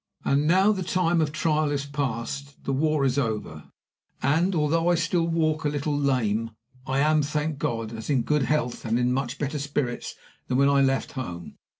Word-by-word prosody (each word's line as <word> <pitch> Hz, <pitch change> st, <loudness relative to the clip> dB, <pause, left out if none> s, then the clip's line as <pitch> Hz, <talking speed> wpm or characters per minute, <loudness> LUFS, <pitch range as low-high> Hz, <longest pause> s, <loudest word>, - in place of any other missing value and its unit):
"And 145 Hz, +2 st, +2 dB
now 190 Hz, +5 st, +5 dB
the 195 Hz, -3 st, -2 dB
time 175 Hz, -2 st, +1 dB
of 150 Hz, -2 st, 0 dB
trial 155 Hz, -1 st, +1 dB
is 140 Hz, -1 st, -2 dB
past; 140 Hz, 0 st, -4 dB
the 135 Hz, -, -1 dB
war 150 Hz, 0 st, +1 dB
is 135 Hz, +1 st, +1 dB
over; 105 Hz, -, -3 dB, 0.6 s
and, 165 Hz, +8 st, +2 dB
although 165 Hz, +2 st, +1 dB
I 175 Hz, -, +4 dB
still 165 Hz, 0 st, +1 dB
walk 160 Hz, -1 st, 0 dB
a 150 Hz, -, +1 dB
little 145 Hz, 0 st, -1 dB
lame, 115 Hz, -6 st, +1 dB, 0.4 s
I 135 Hz, -, 0 dB
am, 155 Hz, +2 st, +3 dB
thank 150 Hz, 0 st, -2 dB
God, 115 Hz, -3 st, -2 dB
in 115 Hz, -, -7 dB
as 110 Hz, -, -7 dB
good 145 Hz, +2 st, +2 dB
health 135 Hz, -1 st, -1 dB
and 115 Hz, +1 st, 0 dB
in 125 Hz, 0 st, +1 dB
much 135 Hz, 0 st, -2 dB
better 145 Hz, +1 st, -2 dB
spirits 140 Hz, -3 st, -3 dB, 0.3 s
than 125 Hz, -, 0 dB
when 140 Hz, +1 st, +4 dB
I 140 Hz, 0 st, +4 dB
left 135 Hz, 0 st, +1 dB
home. 90 Hz, -11 st, -7 dB
140 Hz, 195 wpm, -25 LUFS, 130-155 Hz, 0.6 s, now